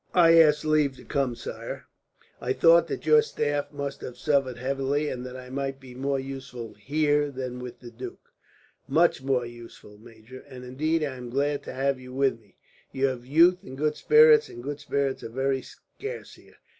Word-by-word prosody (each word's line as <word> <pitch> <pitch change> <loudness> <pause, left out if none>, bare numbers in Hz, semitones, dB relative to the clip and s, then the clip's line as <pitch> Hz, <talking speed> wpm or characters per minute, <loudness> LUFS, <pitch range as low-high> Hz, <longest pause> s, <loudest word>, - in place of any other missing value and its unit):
"I 165 -2 +7
asked 150 -1 +5
leave 150 -3 +2
to - - -15
come, 135 -4 -1
sire. - - -7 0.6
I 130 - 0
thought 170 +4 +5
that - - -5
your 455 0 +6
staff 145 - -2
must 140 -1 -5
have 125 - -8
suffered 135 -4 +1
heavily, 135 +3 -1
and 125 -1 -5
that 125 0 -8
I 125 0 -10
might 135 0 -3
be 130 -2 -12
more 135 +2 -1
useful 130 -4 -7
here 145 +5 +1
than 130 -2 -5
with 125 -1 -9
the 120 -2 -10
duke." 120 +2 -10 0.6
"Much 160 +2 +3
more 130 -2 0
useful, 120 -3 -12
major; 115 +2 -13
and 125 -2 -10
indeed, 155 +6 0
I 135 -3 -3
am 125 -1 -8
glad 140 +3 0
to - - -6
have 135 0 0
you 125 0 -10
with 135 -3 +1
me. 105 -3 -28 0.3
You 135 +1 0
have 125 -1 -7
youth 170 +6 +5
and 135 -9 -10
good 150 +1 0
spirits, 455 0 +6
and 120 - -10
good 145 +2 -5
spirits 140 -2 -1
are - - -6
very 135 +2 -1
scarce 435 - -9
here. - - -19
135 Hz, 195 wpm, -26 LUFS, 125-150 Hz, 0.6 s, I